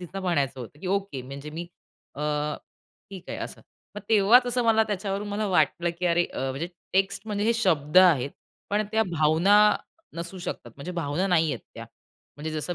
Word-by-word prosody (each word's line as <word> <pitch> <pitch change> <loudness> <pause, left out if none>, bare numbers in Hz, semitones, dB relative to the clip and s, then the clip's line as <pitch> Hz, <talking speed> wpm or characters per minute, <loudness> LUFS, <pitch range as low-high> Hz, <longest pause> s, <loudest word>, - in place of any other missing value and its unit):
तिला 180 +2 -7
म्हणायचं 145 -8 0
होतं 125 +5 -10
की - - -6
ओके 195 -10 -5
म्हणजे 140 +3 -8
मी 165 +3 -6 0.5
अ, 145 - -8 0.9
ठीक 190 -3 -9
आहे - - -4
असं. - - -6 0.4
मग - - -4
तेव्हाच 225 +4 +6
असं 245 0 0
मला 220 -1 +5
त्याच्यावरून 205 0 -3
मला 210 +1 -1
वाटलं 170 0 +2
की 180 - 0
अरे, 175 0 +3
अ, - - -9
म्हणजे 145 +7 -4 0.2
टेक्स्ट 195 +2 0
म्हणजे 205 -1 -1
हे 230 - +4
शब्द 160 -2 +3
आहेत. 150 -8 +5 0.4
पण 210 +1 +1
त्या 220 - +3
भावना 160 +6 +4 0.6
नसू 170 +3 -6
शकतात. 120 -8 -6
म्हणजे 170 +6 -6
भावना 170 +2 -1
नाही 165 -4 +3
आहेत - - -7
त्या. - - -7 0.5
म्हणजे 155 +2 -5
जसं 155 +3 -3
180 Hz, 185 wpm, -26 LUFS, 150-200 Hz, 0.9 s, तेव्हाच